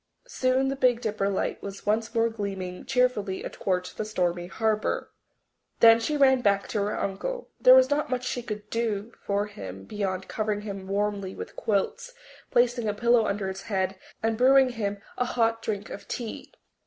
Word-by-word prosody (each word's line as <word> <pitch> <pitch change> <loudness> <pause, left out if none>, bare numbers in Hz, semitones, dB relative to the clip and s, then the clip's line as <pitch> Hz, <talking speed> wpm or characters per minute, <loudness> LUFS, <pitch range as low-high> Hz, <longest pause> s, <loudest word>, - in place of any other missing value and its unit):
Soon 265 - +1
the 275 - -1
Big 250 -3 +3
Dipper 215 -4 -1
light 195 - -2
was 200 0 -8
once 225 +2 0
more 230 0 +4
gleaming 195 -5 -5
cheerfully 250 -7 +1
athwart 180 -1 -2
the - - -1
stormy 175 -4 -1
harbour. 215 +2 -1 0.7
Then 230 0 +8
she 295 +6 -1
ran 265 -2 +5
back 200 -3 +2
to 215 - -1
her 205 +1 -1
uncle. 485 - -3
There - - +8
was - - +5
not 295 +1 +1
much 250 0 -2
she 250 -1 -2
could 210 -3 -6
do 225 -1 -2
for 200 0 0
him 95 - -8
beyond 190 - -3
covering 215 -1 -2
him 200 -2 -6
warmly 200 -1 -1
with - - -8
quilts, 220 - -1 0.4
placing 240 -1 +2
a 210 - 0
pillow 235 0 +3
under 200 -1 -1
his 190 +1 -5
head, 190 -3 -1 0.3
and 225 0 0
brewing 265 +1 +6
him 205 -4 -3 0.2
a 250 - +2
hot 230 -2 +1
drink 210 -2 -4
of 200 - -8
tea. 235 -3 -6
215 Hz, 180 wpm, -27 LUFS, 200-245 Hz, 0.7 s, Then